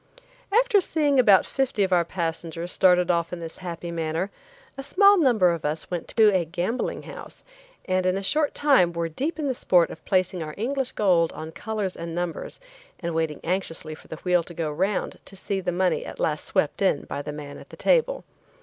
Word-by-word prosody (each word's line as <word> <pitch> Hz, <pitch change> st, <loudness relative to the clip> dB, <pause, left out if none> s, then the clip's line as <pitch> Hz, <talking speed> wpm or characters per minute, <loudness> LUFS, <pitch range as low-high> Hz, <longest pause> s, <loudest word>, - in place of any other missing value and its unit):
After 455 Hz, -1 st, +4 dB
seeing 295 Hz, -6 st, +1 dB
about 205 Hz, -6 st, +6 dB
fifty 265 Hz, -6 st, 0 dB
of 190 Hz, -1 st, +1 dB
our 175 Hz, -1 st, +4 dB
passengers 165 Hz, 0 st, -4 dB
started 180 Hz, -1 st, +4 dB
off 170 Hz, -1 st, 0 dB
in 175 Hz, -, -5 dB
this 165 Hz, -1 st, -8 dB
happy 175 Hz, -1 st, -6 dB
manner, 165 Hz, +3 st, -2 dB, 0.4 s
a 270 Hz, -, -6 dB
smaller 395 Hz, +8 st, +5 dB
number 225 Hz, -, +4 dB
of 170 Hz, -2 st, -4 dB
us 150 Hz, +3 st, -3 dB
went 175 Hz, -2 st, -3 dB
to 215 Hz, -3 st, +4 dB
a 180 Hz, -, +2 dB
gambling 180 Hz, +9 st, -3 dB
house, -, -, -11 dB, 0.4 s
and 185 Hz, -1 st, +1 dB
in 185 Hz, +1 st, +1 dB
a 195 Hz, -, -4 dB
short 300 Hz, +8 st, +1 dB
time 265 Hz, -13 st, +4 dB
were 170 Hz, 0 st, -1 dB
deep 280 Hz, -, -3 dB
in 300 Hz, -2 st, -2 dB
the 265 Hz, -, +1 dB
sport 180 Hz, -8 st, +3 dB
of 160 Hz, -, -11 dB
placing 185 Hz, -2 st, 0 dB
our 155 Hz, -1 st, -6 dB
English 260 Hz, +4 st, -2 dB
gold 175 Hz, -5 st, +3 dB
on 160 Hz, 0 st, -7 dB
colors 210 Hz, 0 st, -3 dB
and 170 Hz, 0 st, -6 dB
numbers 175 Hz, -1 st, -4 dB, 0.4 s
and 170 Hz, -1 st, -3 dB
waiting 160 Hz, -2 st, -2 dB
anxiously 165 Hz, -3 st, -2 dB
for 155 Hz, -, -14 dB
the -, -, -6 dB
wheel 180 Hz, +2 st, +1 dB
to 170 Hz, +1 st, -11 dB
go 155 Hz, -2 st, -2 dB
'round 190 Hz, +6 st, -1 dB
to 195 Hz, -, -11 dB
see 195 Hz, 0 st, -3 dB
the 180 Hz, -, -1 dB
money 185 Hz, +1 st, +1 dB
at -, -, -9 dB
last 150 Hz, -1 st, -1 dB
swept 150 Hz, -, 0 dB
in 190 Hz, -7 st, +2 dB
by 145 Hz, -, -5 dB
the 150 Hz, -, -6 dB
man 145 Hz, -1 st, -8 dB
at -, -, -14 dB
the -, -, -12 dB
table. -, -, +2 dB
180 Hz, 210 wpm, -25 LUFS, 165-220 Hz, 0.4 s, about